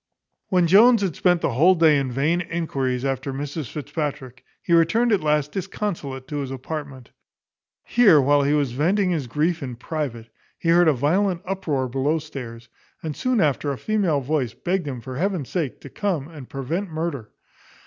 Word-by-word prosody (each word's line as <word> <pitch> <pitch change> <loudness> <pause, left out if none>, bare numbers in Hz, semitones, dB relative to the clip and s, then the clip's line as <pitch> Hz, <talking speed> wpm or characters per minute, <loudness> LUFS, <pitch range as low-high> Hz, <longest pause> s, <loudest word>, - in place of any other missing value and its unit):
When 180 -3 +3
Jones 215 +5 +6
had 185 -6 -1
spent 175 -2 +2
the - - 0
whole 165 +10 +5
day 160 -4 +5
in 135 -2 -2
vain 150 +8 +1
enquiries 135 -7 -2
after 135 0 -2
Mrs 145 0 -5
Fitzpatrick, 145 -3 -5 0.2
he 170 - -1
returned 195 +9 +3
at 205 - +3
last 150 -1 +1
disconsolate 170 -8 -4
to 150 -1 -4
his 140 -2 -3
apartment. 135 -1 -7 0.7
Here, 210 -11 +5
while 145 +1 +4
he 140 +1 +2
was 145 -4 +1
venting 180 - +1
his 150 -7 -2
grief 160 +7 0
in 125 -3 -5
private, 125 -4 -5 0.3
he 165 - -2
heard 175 0 +5
a 155 - +5
violent 175 +7 +1
uproar 160 -9 -2
below 135 +5 0
stairs; 125 -7 -8 0.4
and 155 -2 -4
soon 255 -2 0
after 145 -3 +1
a 135 - -4
female 190 -8 0
voice 135 -3 -1
begged 180 -3 -2
him 130 -4 -5
for 130 +2 -7
heaven's 180 -5 -1
sake 160 -8 -3
to - - -10
come 180 -9 -2
and 150 -6 -11
prevent 160 +9 -3
murder. 155 -8 -4
150 Hz, 180 wpm, -23 LUFS, 135-175 Hz, 0.7 s, Jones